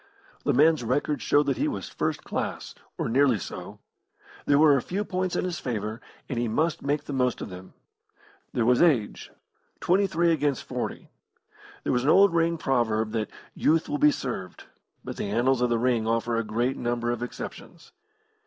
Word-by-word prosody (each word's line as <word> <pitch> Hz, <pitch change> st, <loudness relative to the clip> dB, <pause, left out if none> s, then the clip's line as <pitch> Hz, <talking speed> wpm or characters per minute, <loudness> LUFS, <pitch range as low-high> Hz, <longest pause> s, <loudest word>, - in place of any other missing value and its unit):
The -, -, +3 dB
man's 155 Hz, 0 st, +4 dB
record 145 Hz, +5 st, 0 dB
showed 145 Hz, 0 st, +3 dB
that 135 Hz, -2 st, 0 dB
he -, -, +1 dB
was -, -, -4 dB
first -, -, -3 dB
class -, -, -4 dB, 0.2 s
or -, -, -1 dB
nearly 130 Hz, 0 st, +3 dB
so. 95 Hz, -, -8 dB, 0.7 s
There 140 Hz, -, +5 dB
were 150 Hz, -1 st, +6 dB
a 135 Hz, -, +1 dB
few 200 Hz, +9 st, -3 dB
points 185 Hz, -1 st, -2 dB
in -, -, 0 dB
his 175 Hz, -3 st, -3 dB
favour, 110 Hz, -3 st, -4 dB, 0.3 s
and 125 Hz, -, -3 dB
he 120 Hz, -, 0 dB
must 155 Hz, +8 st, 0 dB
make 145 Hz, +1 st, -1 dB
the 145 Hz, -, -6 dB
most 125 Hz, -2 st, +1 dB
of -, -, -6 dB
them. 90 Hz, +1 st, -11 dB, 0.8 s
There 115 Hz, -, 0 dB
was 125 Hz, +1 st, +4 dB
age 135 Hz, -12 st, +2 dB, 0.5 s
twenty 195 Hz, +3 st, +2 dB
three 170 Hz, -1 st, +2 dB
against 145 Hz, -4 st, 0 dB
forty. -, -, -5 dB, 0.7 s
There -, -, 0 dB
was 125 Hz, -, +1 dB
an 140 Hz, -, +2 dB
old 195 Hz, +2 st, +6 dB
ring 170 Hz, 0 st, +2 dB
proverb 110 Hz, -6 st, 0 dB
that 110 Hz, -2 st, -2 dB, 0.2 s
"Youth 160 Hz, +1 st, +2 dB
will 290 Hz, 0 st, -2 dB
be 300 Hz, +1 st, +6 dB
served," 120 Hz, -, -5 dB, 0.4 s
but -, -, -7 dB
the 100 Hz, -, -3 dB
annals 120 Hz, +4 st, +2 dB
of 125 Hz, -, +2 dB
the 120 Hz, -, +2 dB
ring 115 Hz, -2 st, +1 dB
offer 115 Hz, +1 st, 0 dB
a 115 Hz, -, 0 dB
great 120 Hz, +5 st, -1 dB
number 120 Hz, 0 st, -1 dB
of 120 Hz, -1 st, -3 dB
exceptions. 125 Hz, -, -8 dB
130 Hz, 190 wpm, -26 LUFS, 115-155 Hz, 0.8 s, were